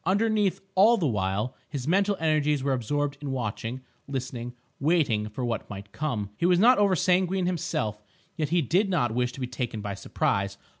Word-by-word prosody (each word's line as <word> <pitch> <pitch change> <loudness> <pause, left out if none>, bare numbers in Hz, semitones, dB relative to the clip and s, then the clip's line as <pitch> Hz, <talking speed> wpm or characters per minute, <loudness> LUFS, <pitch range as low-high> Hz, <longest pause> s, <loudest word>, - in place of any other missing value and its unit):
Underneath, 205 0 +1
all 215 +5 +6
the 180 - 0
while, 105 0 -1
his 140 -3 -5
mental 200 +3 +2
energies 150 -3 +1
were 140 -1 +1
absorbed 140 +3 -1
in 145 - -4
watching, 120 0 -3 0.3
listening, 125 -3 -5 0.2
waiting 135 -9 +2
for 125 +4 -4
what 115 -2 -3
might 100 0 -8
come. 115 -9 -3
He 170 - +2
was 180 -1 +4
not 240 +6 +6
over 200 -2 +4
sanguine 185 0 +2
himself, 110 - -2 0.3
yet 155 -3 -1
he 170 0 +2
did 190 - +2
not 120 -11 +1
wish 125 +1 0
to - - -9
be 130 - -1
taken 125 -2 -4
by 100 -1 -4
surprise. 100 0 -1
140 Hz, 185 wpm, -27 LUFS, 115-180 Hz, 0.3 s, all